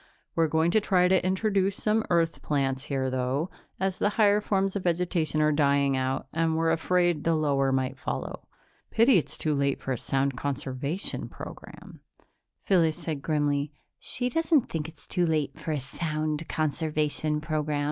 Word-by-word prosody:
We're 165 -1 +2
going 160 +2 +2
to 215 - +3
try 180 -3 +3
to 185 0 +3
introduce 195 +1 +1
some 215 +1 +1
Earth 165 -1 +1
plants 135 -2 -1
here, 135 -2 -1
though, 130 +6 -1 0.3
as 190 0 -1
the 205 - +3
higher 210 -1 +5
forms 195 -1 0
of 200 - -1
vegetation 170 -3 +1
are 155 - +4
dying 140 -2 +3
out 130 0 -1
and 160 0 +1
we're 165 0 +2
afraid 175 0 +1
the 165 0 +2
lower 140 -3 +2
might 130 0 -1
follow. - - -5 0.4
Pity 230 -2 +5
it's - - -5
too 155 - 0
late 140 -1 0
for 135 - -4
a 125 - -1
sound 135 0 0
conservation 140 +5 -3
program." - - -10 0.6
Phyllis 165 -5 +3
said 160 -4 -4
grimly, 145 -1 0 0.3
"She 250 - -2
doesn't 320 +1 +2
think 160 -1 -3
it's 160 - -16
too 180 -2 0
late 150 -4 -1
for 160 - -4
a 150 - 0
sound 155 +3 -3
conservation 155 0 0
program. 150 -1 -1
155 Hz, 165 wpm, -27 LUFS, 140-180 Hz, 0.6 s, higher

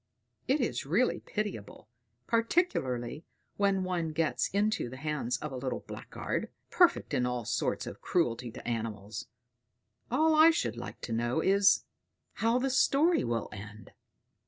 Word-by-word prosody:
It 275 +3 +3
is 245 - -1
really 210 - +2
pitiable, 190 - -5 0.4
particularly 170 - 0 0.3
when 195 -2 +2
one 175 -4 -2
gets 160 0 +1
into 205 - 0
the 130 - -9
hands 150 -4 -2
of 150 - -6
a - - -5
little 130 0 -3
blackguard, - - -5 0.2
perfect - - +3
in 125 - +2
all 125 -2 -2
sorts - - -1
of - - -8
cruelty 125 -8 0
to - - -9
animals: 110 -3 -4 0.8
all 315 +6 +3
I 310 +1 +8
should 330 - 0
like - - -8
to 115 - -4
know 120 +5 0
is, 195 +3 +4 0.5
how 230 +2 +2
the 265 +1 0
story 285 +6 +3
will 115 -2 -1
end." 105 +1 -10
160 Hz, 145 wpm, -30 LUFS, -, 0.8 s, I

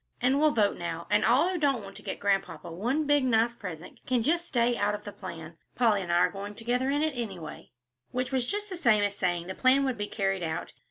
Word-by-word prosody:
And 260 +3 +2
we'll 310 +1 +5
vote 210 -8 +1
now, 170 -1 -4
and 210 - +4
all 255 +9 +4
who 370 -2 -2
don't 275 -7 +1
want 195 0 -10
to - - -10
get - - -5
Grandpapa 195 -3 -1
one 245 - -1
big, 290 -1 +3
nice 235 -1 +3
present, 180 -6 -8
can 250 -3 +1
just 340 +6 +1
stay 240 -3 +2
out 210 -2 +1
of 210 - -9
the 205 - -7
plan. 165 -4 -9 0.2
Polly 225 -5 +3
and 175 -2 -4
I - - +3
are 175 - +4
going 205 +1 -7
together 245 +4 -1
in 290 +2 +1
it, 310 -2 0
anyway." 190 -10 -6 0.4
Which 250 +1 -2
was 255 -2 0
just 415 0 -2
the 370 - -4
same 235 -10 +4
as 205 0 0
saying 175 -3 -1
the 185 - -5
plan 265 +5 +4
would 255 -5 -2
be 205 - -1
carried 195 -3 -1
out. 160 -1 -4
225 Hz, 250 wpm, -28 LUFS, 195-260 Hz, 0.4 s, we'll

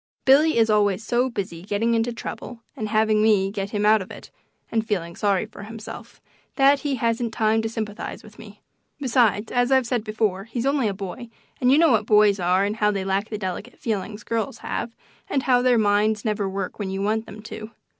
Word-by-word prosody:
Billy 295 +3 +5
is 225 -1 +4
always 205 -1 +2
so 245 +3 +1
busy 190 -7 -5
getting 205 +5 0
into 230 +1 +1
trouble 235 0 -7
and 215 -1 -4
having 215 0 +2
me 205 -3 +3
get 200 -1 -4
him 210 0 -1
out 215 0 +5
of 185 - -8
it, - - -11 0.4
and 225 -1 +1
feeling 170 -6 -2
sorry 200 -1 +1
for 215 -1 -12
himself, 220 +1 -9 0.4
that 275 0 +5
he 285 -2 -1
hasn't 230 0 -1
time 220 0 +2
to 225 - -2
sympathize 220 -1 -5
with - - -16
me. - - -13 0.4
Besides, 235 -5 +2
as 245 +1 +1
I've 265 -1 +4
said 235 -2 -1
before, 215 -3 -1
he's 235 +2 -4
only 275 -4 +2
a 200 - -1
boy, 200 +5 -7 0.3
and 250 0 +3
you 275 - +6
know 325 -2 +5
what 220 -2 +2
boys 210 -2 +5
are 180 +2 +2
and 205 +2 -2
how 210 -1 +2
they 195 -2 -2
lack 195 +2 -1
the 215 - -4
delicate 200 +4 -5
feelings 210 -1 -4
girls 230 +5 -2
have, 230 - -4 0.3
and 270 - 0
how 250 -2 +3
their 250 -1 +3
minds 210 0 +2
never 210 -2 -1
work 195 +1 -5
when 200 -2 -3
you 195 +1 -3
want 220 +2 -1
them 210 0 -10
to. 215 0 -8
215 Hz, 215 wpm, -23 LUFS, 205-235 Hz, 0.4 s, you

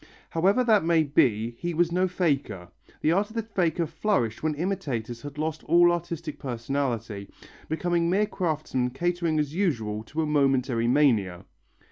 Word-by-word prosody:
However 195 +9 +3
that 220 -6 +4
may 165 -1 +3
be, 120 -6 +2
he 175 -1 -3
was 170 +1 +2
no 185 +2 +2
faker; 140 - -1 0.3
the 155 - +3
art 200 +4 +1
of 220 - -14
the 225 - -1
faker 180 -6 0
flourished 150 - -1
when 155 -1 0
imitators 140 - -3
had 145 +1 -9
lost 155 0 -3
all 175 0 +5
artistic 170 -3 -4
personality, 120 -5 -3 0.4
becoming 170 +1 0
mere 200 +4 +3
craftsmen 155 -10 -2
catering 170 +3 -1
as 150 -1 -1
usual 115 - -1
to 160 +7 -2
a - - 0
momentary 135 -5 +1
mania. 115 -10 +2
155 Hz, 155 wpm, -26 LUFS, 125-175 Hz, 0.4 s, all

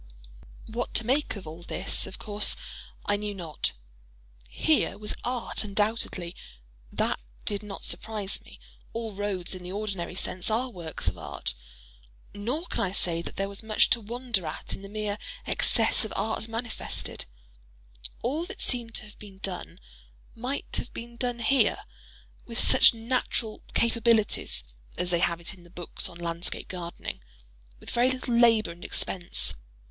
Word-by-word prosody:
What 235 +2 -3
to 230 - +3
make 270 +3 +2
of 200 - -7
all 160 +2 -7
this, 170 - +1
of - - -7
course 210 0 +6 0.5
I 205 - +3
knew 205 0 -3
not. 165 -5 -1 0.8
Here 315 - +3
was 210 0 -1
art 245 -2 -1
undoubtedly—that 175 - -2 0.3
did 205 -1 -1
not 210 -2 -7
surprise 210 -3 0
me—all - - -8
roads, 195 -3 +1
in 185 - -5
the 180 0 -6
ordinary 195 -4 -3
sense, 185 0 -1
are 240 +4 +1
works 170 -6 -5
of - - 0
art; - - -3 0.8
nor 240 +12 -2
can - - -2
I 190 -1 +1
say 170 -3 +2
that - - -7
there 195 - 0
was 200 0 -6
much 220 -1 +3
to 235 - +4
wonder 230 -4 -1
at 155 - -4
in - - -5
the 195 - -8
mere 210 0 -2 0.3
excess - - +4
of 220 - -4
art 220 +2 0
manifested; 230 +1 -2 1.0
all 295 +8 +1
that - - -7
seemed 235 -3 0
to - - +1
have 210 - -15
been 200 -2 -11
done, 190 -1 -5 0.5
might 255 +5 -3
have - - -3
been 235 0 -6
done 245 -1 -1
here—with 235 -1 0
such - - +7
natural 230 -1 -1
"capabilities" 230 -2 +3 0.3
(as 180 0 +1
they 175 - +3
have 170 -1 +2
it 170 - -6
in 180 -2 -15
the 175 - -16
books 175 -1 0
on 170 - -10
Landscape 170 0 -1
Gardening)—with - - -8
very 245 +2 +4
little 255 -1 -1
labor 230 -4 +6
and 170 +1 -11
expense. 175 -2 +1
205 Hz, 155 wpm, -29 LUFS, 175-230 Hz, 1.0 s, such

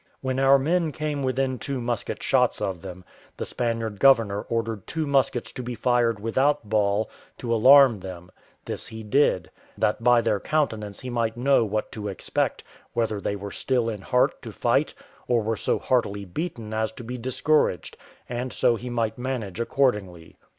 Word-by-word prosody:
When 130 0 -1
our 135 +1 +6
men 160 +4 +1
came 150 -1 -3
within 130 -1 -1
two 135 +3 -3
musket 120 -3 -3
shots - - +2
of 95 -3 -3
them, 90 -1 -9 0.3
the - - -3
Spaniard 115 -3 -2
governor 115 -6 +4
ordered 115 -3 -2
two 160 -2 -2
muskets 135 -3 +1
to - - -6
be 120 0 -5
fired 115 -1 +1
without 130 +4 +1
ball, 105 0 +1 0.3
to 115 -2 -2
alarm 130 +1 +7
them; 90 -2 -9 0.3
this - - -5
he 110 0 -8
did, 105 -4 +2 0.3
that 105 +2 0
by 120 -1 +5
their 110 -3 +1
countenance 110 -8 -1
he 125 - -6
might 115 -1 -1
know 135 0 +3
what 110 0 -2
to 105 -2 -5
expect, 100 - -2 0.3
whether 110 -3 -1
they 100 - -2
were 100 0 -7
still 125 -3 0
in 105 -3 -5
heart 125 +5 +1
to - - -8
fight, - - +1 0.3
or 120 -3 +2
were 110 +1 0
so - - 0
heartily 100 -6 0
beaten 110 - -5
as 110 0 0
to 120 - -9
be 125 +2 -6
discouraged, 130 - +1 0.3
and 125 +1 -4
so 120 - +2
he 125 +3 -7
might 115 -1 -1
manage 120 -7 -4
accordingly. 105 -10 -1
115 Hz, 175 wpm, -25 LUFS, 105-130 Hz, 0.3 s, alarm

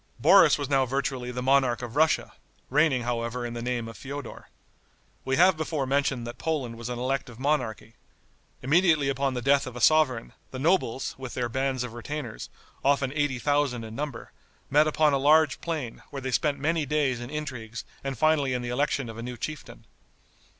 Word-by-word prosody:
Boris - - +6
was 145 -2 -3
now 135 -1 +3
virtually 130 -1 -2
the 125 0 -4
monarch 130 -2 +2
of 120 +1 -7
Russia, 160 +2 +2 0.4
reigning, 140 -3 +3
however, 120 0 -2
in 120 - -5
the 120 - -5
name 120 -1 -2
of 115 - -9
Feodor. 140 +1 -8 0.7
We 130 - 0
have 180 +3 +5
before 155 -3 -2
mentioned 135 -2 0
that 120 - -8
Poland 140 -8 -2
was 115 +1 -7
an 125 - -3
elective 125 -1 -3
monarchy. 125 -6 -1 0.7
Immediately 155 0 +3
upon 135 -1 0
the 125 - -3
death 140 0 +3
of 125 - -8
a - - -5
sovereign, 130 -3 +3 0.2
the 130 - -7
nobles, 135 -4 +1
with 130 -2 -7
their 120 -2 -1
bands 130 +1 -1
of 125 -2 -6
retainers, 120 -1 -6 0.3
often 140 -1 +2
eighty 145 -3 0
thousand 145 -3 0
in 110 0 -8
number, 140 -3 -5 0.4
met 150 +2 +5
upon 155 -1 +3
a 135 - +2
large 150 +1 +4
plain, 155 -9 -4
where 140 - -6
they 130 -1 -4
spent 145 +2 +1
many 160 +3 0
days 140 -4 0
in 120 - -7
intrigues 125 -7 -6 0.2
and 135 -2 -4
finally 145 -2 +2
in 125 - -3
the 120 - -4
election 140 +1 0
of 115 0 -8
a - - -4
new 125 +1 -6
chieftain. 155 +5 -7
135 Hz, 190 wpm, -27 LUFS, 120-145 Hz, 0.7 s, Boris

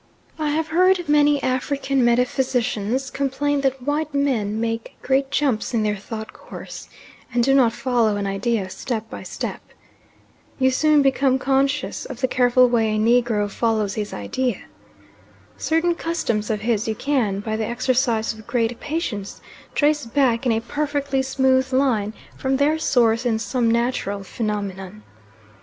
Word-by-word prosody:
I 305 -1 0
have 310 +1 -1
frequently 320 -4 +4
heard - - -8
African 270 +1 0
metaphysicians 245 0 0
complain 280 +1 -1
that 270 -2 -1
white 295 +1 -2
men 225 -7 0
make 225 0 -3
great 270 +1 +1
jumps 270 -5 0
in 220 - +2
their 210 0 0
thought 220 +2 -7
course, - - -10 0.4
and 240 0 +2
do 270 +2 +3
not 255 -4 +5
follow 235 -3 +1
an 200 - -2
idea 195 +1 -1
step 225 -1 -4
by - - -7
step. - - -5 1.0
You 260 -1 +3
soon 300 +2 +4
become 270 -1 +3
conscious 275 +2 0
of - - -8
the 260 - +3
careful 250 0 +4
way 225 -3 +1
a - - 0
Negro 225 -1 +2
follows 215 -1 0
his 210 -1 -4
idea. 240 - -2 0.9
Certain 325 +2 +1
customs 320 -11 -2
of 215 -2 -1
his 220 -1 0
you 220 - -1
can, 235 -8 0
by 220 +1 -3
the 220 0 -2
exercise 240 -2 0
of 220 -1 -14
great 240 -1 -1
patience, 240 - -4 0.4
trace 295 -3 +2
back 250 -1 +1
in - - +3
a 225 0 +1
perfectly 285 +1 -1
smooth 265 0 +1
line 245 -6 +1 0.2
from 265 0 0
their 300 +3 +2
source 235 -5 +2
in 235 -3 +1
some 230 +2 0
natural 230 -4 -1
phenomenon. 200 -1 -4
245 Hz, 150 wpm, -22 LUFS, 220-275 Hz, 1.0 s, not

